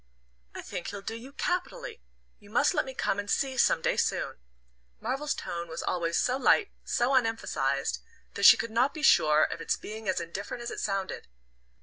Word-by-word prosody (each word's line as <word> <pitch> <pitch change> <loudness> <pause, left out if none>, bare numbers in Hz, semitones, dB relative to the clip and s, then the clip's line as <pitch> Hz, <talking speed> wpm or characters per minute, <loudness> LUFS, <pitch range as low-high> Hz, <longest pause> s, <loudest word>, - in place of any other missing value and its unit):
"I - - -6
think 175 - -6
he'll 200 -1 -6
do 220 - -4
you 245 +4 -10
capitally 440 - -3 0.4
you 205 -2 -17
must 245 +7 +3
let - - +1
me 265 -1 -8
come 200 - 0
and 205 0 -5
see 265 +4 0
some 165 -9 +3
day - - +1
soon." - - -1 0.6
Marvell's 270 +5 -2
tone 170 0 -5
was 160 0 -5
always 170 -2 -1
so 255 +1 +1
light, 400 +8 +3
so 245 +3 +1
unemphasized, 225 - 0 0.3
that - - 0
she - - +10
could 230 0 -4
not 250 +6 +2
be 310 - -6
sure 155 - +5
of - - -2
its - - 0
being 215 -1 -6
as 185 - +1
indifferent 200 +7 -6
as 235 - -4
it - - -5
sounded. 195 -2 -3
225 Hz, 195 wpm, -28 LUFS, 185-265 Hz, 0.6 s, she